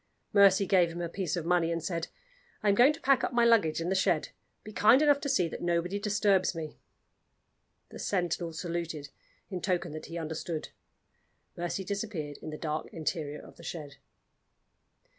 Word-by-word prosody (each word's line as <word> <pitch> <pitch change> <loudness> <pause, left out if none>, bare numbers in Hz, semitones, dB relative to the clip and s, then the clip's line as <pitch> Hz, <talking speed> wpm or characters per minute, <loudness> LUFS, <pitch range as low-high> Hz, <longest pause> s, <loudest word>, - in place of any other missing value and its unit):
Mercy 200 -1 +6
gave 180 -2 +4
him 170 - -7
a 170 - -2
piece 185 +2 -3
of 170 -2 -3
money, 170 -1 +2
and 165 -1 -2
said: 165 -2 -2 0.6
"I 210 - +3
am - - +5
going 245 +8 +6
to 325 - -11
pack 275 -1 +3
up - - -1
my 235 -1 +4
luggage 215 -10 +4
in 165 +1 -2
the - - +2
shed. 185 -4 +1 0.3
Be 215 - -10
kind 220 +6 +6
enough 290 -1 +4
to 280 - -2
see 185 -11 +2
that - - -7
nobody 175 +3 0
disturbs 200 -3 +2
me." 155 -2 -6 1.1
The - - -10
sentinel 175 -3 -1
saluted, 165 -3 -4 0.4
in 185 -2 -4
token 175 -3 -1
that 155 +1 -7
he 165 - -6
understood. 160 0 -4 0.9
Mercy 175 +3 -3
disappeared 195 -8 -4
in - - -6
the 155 - -6
dark 155 0 -3
interior 155 -2 -3
of - - -15
the - - -13
shed. 150 -4 -7
175 Hz, 180 wpm, -30 LUFS, 165-200 Hz, 1.1 s, Mercy